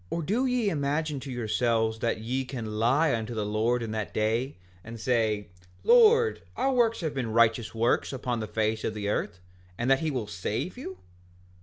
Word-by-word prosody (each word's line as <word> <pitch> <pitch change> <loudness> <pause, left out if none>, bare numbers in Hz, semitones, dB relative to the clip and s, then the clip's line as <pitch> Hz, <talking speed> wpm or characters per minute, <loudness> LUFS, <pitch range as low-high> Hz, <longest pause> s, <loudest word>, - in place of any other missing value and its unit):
5:17 - - -1
Or - - -1
do 220 - 0
ye 250 -4 +1
imagine 150 0 -1
to 135 0 -7
yourselves 110 -1 0
that 115 -1 0
ye 125 +4 -2
can 115 -5 -5
lie 140 +7 +3
unto 115 0 -3
the 105 -2 -1
Lord 115 +3 0
in 110 - -4
that 110 -1 -4
day, 115 +6 0 0.3
and 115 0 -9
say—Lord, 115 - +2 0.2
our 270 0 +1
works 230 -4 +2
have 160 -3 -2
been 125 -5 -3
righteous 115 0 +2
works 115 +2 +1
upon 125 -3 -3
the 110 - -4
face 110 +1 -1
of 110 - -2
the 105 -1 -3
earth—and 90 +3 -4
that 135 - +5
he 160 - -1
will 125 -6 -2
save 105 - -3
you? 220 -7 -7
115 Hz, 185 wpm, -27 LUFS, 110-145 Hz, 0.3 s, that